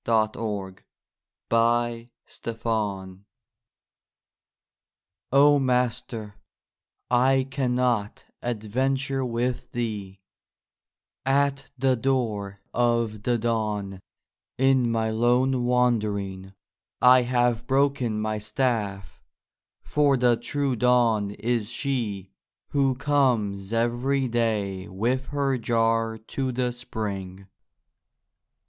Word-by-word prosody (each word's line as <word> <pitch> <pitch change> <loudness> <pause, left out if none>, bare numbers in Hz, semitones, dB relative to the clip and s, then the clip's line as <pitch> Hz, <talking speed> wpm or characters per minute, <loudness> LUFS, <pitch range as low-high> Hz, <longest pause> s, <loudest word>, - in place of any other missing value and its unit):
49 110 -3 -1 0.7
THE - - 0
LOST 120 0 +1 0.4
DISCIPLE 105 -5 -3 2.1
O 145 +2 +6
Master, 125 -4 -1 0.8
I 130 +2 +3
can 130 -2 0
not 120 -5 0 0.2
adventure 130 +4 -1
with 120 0 -2
thee; 105 -5 -4 1.0
At 140 +1 +1
the 130 0 +2
Door 110 -6 -1
of 115 -3 +1
the 120 +2 +1
Dawn, 105 -4 -2 0.6
in 130 -2 +3
my 110 -1 0
lone 125 +3 +2
wandering, 105 -6 0 0.5
I 125 0 +7
have 120 -1 +1
broken 135 -5 +1
my 110 0 -2
staff; 105 -5 -2 0.6
for 145 -2 +2
the 120 -1 +4
true 135 +3 -1
dawn 115 -3 +3
is 115 +1 -2
she 115 -8 -3 0.4
Who 135 -2 +2
comes 115 -9 +1
every 120 +4 +1
day 105 -5 -1
with 120 +7 -1
her 140 -2 0
jar 115 0 +1
to 130 +4 -4
the 125 0 -1
spring. 100 -6 -5
120 Hz, 90 wpm, -25 LUFS, 105-130 Hz, 2.1 s, I